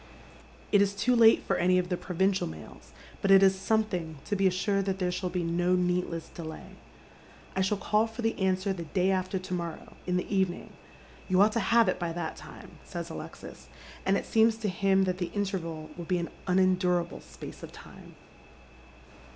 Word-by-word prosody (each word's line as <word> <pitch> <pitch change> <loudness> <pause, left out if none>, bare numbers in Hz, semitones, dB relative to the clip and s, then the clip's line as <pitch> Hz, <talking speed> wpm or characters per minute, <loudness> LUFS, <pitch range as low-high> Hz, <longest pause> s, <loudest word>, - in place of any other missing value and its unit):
It 205 - +5
is 200 0 +1
too 250 +5 +2
late 225 -1 +6
for - - 0
any 180 +1 +3
of 180 -1 0
the 180 - +1
provincial 190 +2 0
mails, 80 -1 -11 0.3
but 195 - 0
it 195 0 +8
is 190 0 +6
something 190 -5 -1
to 205 - -1
be 195 -1 +3
assured 195 +1 0
that 195 -1 -1
there 180 -2 0
shall 180 +1 -2
be 180 0 -2
no 175 +2 +1
needless 180 -2 -1
delay. 160 -2 -8 0.4
" - - -23
I 190 - +1
shall 190 +2 +1
call 215 +2 +1
for 225 +1 -7
the 225 - +1
answer 190 +1 +1
the 170 -3 -6
day 185 +5 +1
after 185 0 -1
to 185 0 -6
morrow, 170 -2 -5
in 180 0 +1
the 180 +3 -2
evening. 190 -2 -1 0.5
You 185 -1 +2
ought 210 +2 +6
to 230 - 0
have 230 +2 +4
it 185 - 0
by 170 -2 -2
that 165 -2 -4
time," - - -13
says - - -6
Alexis, - - -9 0.3
and 195 +1 +2
it - - -4
Beems 225 0 +4
to 210 - 0
him 195 +1 +2
that 185 -1 -1
the 175 - -2
interval 170 -6 -3
will 170 - -7
be 180 +2 0
an 170 -1 -3 0.2
unendurable 180 -2 +2
space - - -11
of - - -9
time. - - -14
185 Hz, 200 wpm, -29 LUFS, 175-195 Hz, 0.5 s, it